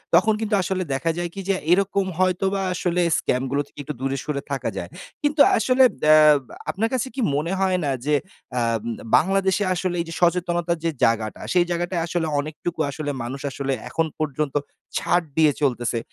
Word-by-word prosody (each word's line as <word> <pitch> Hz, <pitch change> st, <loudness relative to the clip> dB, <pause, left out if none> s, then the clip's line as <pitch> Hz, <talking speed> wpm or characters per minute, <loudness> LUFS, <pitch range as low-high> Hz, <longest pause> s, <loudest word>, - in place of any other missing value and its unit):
তখন 215 Hz, +5 st, +5 dB
কিন্তু 215 Hz, -1 st, +1 dB
আসলে 185 Hz, 0 st, -1 dB
দেখা 165 Hz, +5 st, 0 dB
যায় 175 Hz, 0 st, -2 dB
কি 195 Hz, -, -5 dB
যে 195 Hz, -, +3 dB, 0.2 s
এরকম 195 Hz, +1 st, +2 dB
হয়তোবা 190 Hz, +1 st, +1 dB
আসলে 180 Hz, 0 st, 0 dB, 0.2 s
scam 125 Hz, +1 st, 0 dB
গুলো 140 Hz, +1 st, +1 dB
থেকে -, -, -17 dB
একটু 150 Hz, -, -5 dB
দূরে 135 Hz, +1 st, -1 dB
সরে 145 Hz, -2 st, -3 dB
থাকা 135 Hz, -, -1 dB
যায়। -, -, -5 dB, 0.3 s
কিন্তু 290 Hz, 0 st, +2 dB, 0.2 s
আসলে 255 Hz, +4 st, +4 dB, 0.2 s
দ্যা 155 Hz, 0 st, +7 dB, 0.3 s
বা -, -, -14 dB, 0.2 s
আপনার 225 Hz, +4 st, 0 dB
কাছে 255 Hz, 0 st, 0 dB
কি 270 Hz, -, -2 dB
মনে 155 Hz, +4 st, -1 dB
হয় 190 Hz, -1 st, +2 dB
না? 140 Hz, -, +1 dB
যে 150 Hz, 0 st, +3 dB, 0.4 s
আ 120 Hz, -, +2 dB, 0.2 s
উম 120 Hz, -, -2 dB, 0.2 s
বাংলাদেশে 195 Hz, +4 st, +2 dB
আসলে 180 Hz, 0 st, -2 dB
এই -, -, -4 dB
যে -, -, -6 dB
সচেতনতার 175 Hz, 0 st, +1 dB
যে 165 Hz, -, +2 dB
জায়গাটা 110 Hz, -1 st, +1 dB
সেই 175 Hz, -1 st, +4 dB
জায়গাটায় 175 Hz, 0 st, -1 dB
আসলে 170 Hz, -1 st, -1 dB
অনেকটুকু 155 Hz, +3 st, -5 dB
আসলে 145 Hz, +1 st, -3 dB
মানুষ 130 Hz, +3 st, -5 dB
আসলে 135 Hz, 0 st, -2 dB, 0.2 s
এখন 165 Hz, -, 0 dB
পর্যন্ত 150 Hz, -1 st, -2 dB, 0.4 s
ছাড় 175 Hz, 0 st, +1 dB
দিয়ে 155 Hz, -2 st, +5 dB
চলতেছে? 120 Hz, -4 st, 0 dB
170 Hz, 185 wpm, -23 LUFS, 145-190 Hz, 0.4 s, দ্যা